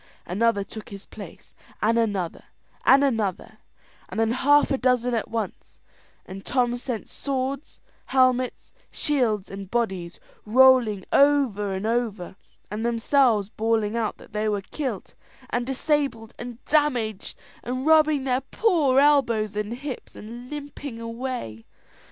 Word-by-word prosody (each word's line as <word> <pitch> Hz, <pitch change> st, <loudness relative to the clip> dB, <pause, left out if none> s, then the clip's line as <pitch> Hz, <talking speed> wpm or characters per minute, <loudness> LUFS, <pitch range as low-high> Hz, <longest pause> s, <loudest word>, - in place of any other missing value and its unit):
Another 205 Hz, +2 st, +1 dB
took 215 Hz, +2 st, -10 dB
his 200 Hz, -1 st, -10 dB
place, -, -, -12 dB, 0.3 s
and 230 Hz, +2 st, +2 dB
another, 200 Hz, -7 st, -2 dB, 0.4 s
and 275 Hz, +1 st, +7 dB
another, 225 Hz, -8 st, -1 dB, 0.5 s
and -, -, -4 dB
then 225 Hz, 0 st, +2 dB
half 290 Hz, +4 st, +4 dB
a 270 Hz, -, +2 dB
dozen 250 Hz, -1 st, +2 dB
at 225 Hz, -, -1 dB
once, 225 Hz, -4 st, -5 dB, 0.5 s
and 195 Hz, +1 st, -9 dB
Tom 245 Hz, -2 st, +1 dB
sent 245 Hz, -3 st, -5 dB
swords, 275 Hz, +1 st, -4 dB, 0.3 s
helmets, 255 Hz, -1 st, +1 dB, 0.2 s
shields, 230 Hz, -10 st, 0 dB
and 195 Hz, -1 st, -7 dB
bodies, 190 Hz, -7 st, -2 dB, 0.2 s
rolling 235 Hz, -3 st, +5 dB
over 270 Hz, -9 st, +3 dB
and 190 Hz, +2 st, -3 dB
over, 220 Hz, -6 st, -2 dB, 0.4 s
and 215 Hz, +2 st, -3 dB
themselves 235 Hz, -2 st, +2 dB
bawling 220 Hz, -1 st, 0 dB
out 230 Hz, -2 st, -1 dB
that -, -, -17 dB
they 215 Hz, 0 st, 0 dB
were 205 Hz, -1 st, -1 dB
kilt, 265 Hz, +7 st, -5 dB, 0.4 s
and 245 Hz, 0 st, -1 dB
disabled, 265 Hz, -4 st, -1 dB
and 240 Hz, 0 st, -8 dB
damaged, 245 Hz, -9 st, 0 dB, 0.2 s
and 255 Hz, +2 st, -4 dB
rubbing 310 Hz, -3 st, +4 dB
their 260 Hz, -1 st, 0 dB
poor 310 Hz, -, +2 dB
elbows 235 Hz, -8 st, +3 dB
and 210 Hz, +1 st, -3 dB
hips, 270 Hz, 0 st, -7 dB
and 240 Hz, +3 st, -9 dB
limping 285 Hz, -4 st, -7 dB
away. 230 Hz, -, -5 dB
235 Hz, 135 wpm, -25 LUFS, 215-265 Hz, 0.5 s, and